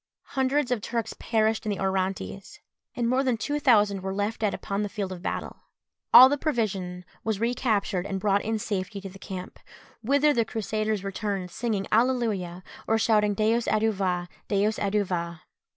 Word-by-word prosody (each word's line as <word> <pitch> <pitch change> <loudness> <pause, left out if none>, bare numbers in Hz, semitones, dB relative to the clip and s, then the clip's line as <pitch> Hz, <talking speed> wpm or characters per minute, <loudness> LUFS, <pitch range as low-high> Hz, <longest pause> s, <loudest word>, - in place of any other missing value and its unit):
Hundreds 265 0 +1
of 240 -4 0
Turks 230 +1 -3
perished 220 -1 +1
in 215 - -3
the 200 - -2
Orontes, 190 +1 -2 0.4
and 240 -1 0
more 255 +2 +2
than 255 -4 +1
two 290 +6 -2
thousand 210 -8 +4
were 190 +1 -3
left 205 +3 -2
dead 210 -2 +2
upon 200 +1 -3
the 205 - -2
field 195 -2 -4
of 180 -2 -7
battle. - - -4 0.5
All 255 - +11
the 290 +1 0
provision 190 - -2 0.2
was 220 -3 -1
recaptured 220 -5 0
and 195 -1 -3
brought 200 0 +2
in 220 +1 -1
safety 200 -2 -3
to 195 - -7
the 195 +1 -13
camp, 185 -1 -7 0.4
whither 285 +5 +3
the 235 - +2
Crusaders 215 -2 -2
returned 195 -2 -3
singing 220 -3 -2
Alleluia! 215 -7 +1 0.2
or 225 - +3
shouting 210 -2 +2
_Deus 225 +3 +1
adjuva! 195 -5 0 0.2
Deus 210 +1 +1
adjuva! 180 -5 -1
210 Hz, 170 wpm, -26 LUFS, 195-230 Hz, 0.5 s, All